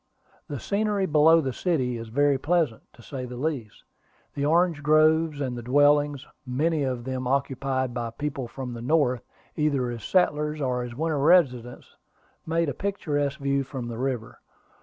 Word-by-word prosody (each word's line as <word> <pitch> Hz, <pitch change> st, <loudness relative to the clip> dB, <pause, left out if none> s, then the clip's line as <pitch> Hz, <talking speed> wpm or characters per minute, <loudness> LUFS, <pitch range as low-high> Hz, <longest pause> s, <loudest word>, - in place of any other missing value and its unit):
The 145 Hz, -, -5 dB
scenery 205 Hz, -, 0 dB
below 160 Hz, 0 st, +5 dB
the 135 Hz, -3 st, -3 dB
city 130 Hz, -9 st, 0 dB
is 115 Hz, 0 st, -6 dB
very 140 Hz, +4 st, +2 dB
pleasant, 155 Hz, -6 st, 0 dB
to 120 Hz, -, -17 dB
say 130 Hz, 0 st, -6 dB
the 125 Hz, 0 st, -8 dB
least. 130 Hz, -6 st, -4 dB, 0.5 s
The 140 Hz, -, -3 dB
orange 165 Hz, 0 st, +2 dB
groves, 155 Hz, 0 st, +3 dB
and 130 Hz, -3 st, -2 dB
the 120 Hz, -, -5 dB
dwellings, 145 Hz, +2 st, +3 dB, 0.2 s
many 150 Hz, +5 st, 0 dB
of 130 Hz, -3 st, -2 dB
them 130 Hz, 0 st, -3 dB
occupied 135 Hz, -1 st, -1 dB
by 120 Hz, -1 st, -3 dB
people 135 Hz, +1 st, -4 dB
from 125 Hz, 0 st, -6 dB
the 115 Hz, -, -7 dB
North, 130 Hz, -2 st, +2 dB, 0.3 s
either 140 Hz, -5 st, 0 dB
as 115 Hz, -2 st, -7 dB
settlers 150 Hz, -4 st, +1 dB
or 125 Hz, -3 st, -1 dB
as 120 Hz, -1 st, -6 dB
winter 155 Hz, +1 st, -1 dB
residents, 135 Hz, -7 st, +2 dB, 0.5 s
made 165 Hz, 0 st, +1 dB
a 140 Hz, -, -1 dB
picturesque 145 Hz, -6 st, -2 dB
view 140 Hz, 0 st, 0 dB
from 130 Hz, -3 st, -6 dB
the 115 Hz, 0 st, -6 dB
river. 130 Hz, -4 st, -3 dB
140 Hz, 165 wpm, -26 LUFS, 125-155 Hz, 0.5 s, below